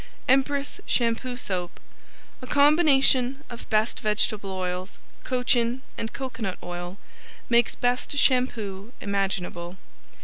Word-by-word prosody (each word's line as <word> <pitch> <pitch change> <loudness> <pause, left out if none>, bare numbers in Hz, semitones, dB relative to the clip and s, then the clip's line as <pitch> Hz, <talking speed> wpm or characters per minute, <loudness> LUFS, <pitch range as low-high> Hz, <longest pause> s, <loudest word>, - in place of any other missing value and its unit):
Empress 275 +2 +1
Shampoo 245 +1 0
Soap 180 -7 -3 0.6
A 255 - -8
combination 280 -2 +4
of 235 - -9
best 215 +1 +1
vegetable 210 -1 0
oils, 185 0 -4 0.3
cochin 250 0 +1
and 225 - -4
coconut 230 -8 -4
oil, 175 +1 -6 0.5
makes 235 -1 +3
best 245 +3 0
shampoo 235 -6 +1
imaginable. 190 -3 -2
235 Hz, 100 wpm, -26 LUFS, 195-255 Hz, 0.6 s, combination